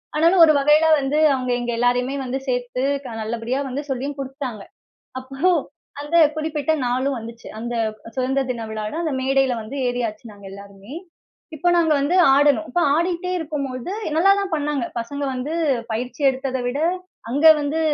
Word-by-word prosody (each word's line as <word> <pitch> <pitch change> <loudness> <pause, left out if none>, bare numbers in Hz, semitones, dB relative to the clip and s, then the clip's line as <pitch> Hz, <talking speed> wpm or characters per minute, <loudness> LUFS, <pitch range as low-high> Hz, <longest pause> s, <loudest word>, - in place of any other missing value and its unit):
ஆனாலும் 335 +3 +5
ஒரு 310 - +4
வகையில 300 +3 +4
வந்து 275 +2 -1 0.2
அவங்க, 255 -1 -3
எங்க 240 0 -3
எல்லோரையுமே 245 +2 +1
வந்து 255 +1 -2
சேத்து 250 0 -2 0.2
க - - -8 0.2
நல்லபடியா 235 +4 -3
வந்து 270 +3 -3
சொல்லியும் 275 +2 -3
குடுத்துட்டாங்க. 265 -5 -5 0.6
அப்போ 265 +1 -12 0.6
அந்த 295 +4 -1 0.2
குறிப்பிட்ட 310 -1 -1
நாளும் 260 +3 0
வந்துச்சு, 230 +1 -10
அந்த 240 +1 -4 0.3
அ - - -11
சுதந்திர 265 +1 0
தின 230 -2 -6
விழால 215 +2 -4
அந்த 315 -4 -2
மேடையில 270 -1 +2
வந்து 235 +6 -8
ஏறியாச்சு, 235 -3 -3
நாங்க 200 -1 -14
எல்லாருமே. 200 +4 -12 0.6
இப்ப 350 +4 +1
நாங்க 330 -2 +3
வந்து 285 +5 0 0.2
ஆடணும், 290 +2 +3
இப்ப 350 - 0 0.2
ஆடிகிட்டே 350 +1 -1
இருக்கும்பொழுது 285 -3 -4 0.2
எ - - -5
நல்லாதான் 395 +2 +3
பண்ணாங்க. 295 -4 -1
பசங்க 280 +5 -4
வந்து 255 +5 -4 0.4
பயிற்சி 245 +6 -4
எடுத்தத 265 0 -2
விட 245 +3 -2 0.5
அங்க 285 +6 +2
வந்து, 295 +2 -1
270 Hz, 155 wpm, -21 LUFS, 245-300 Hz, 0.6 s, ஆனாலும்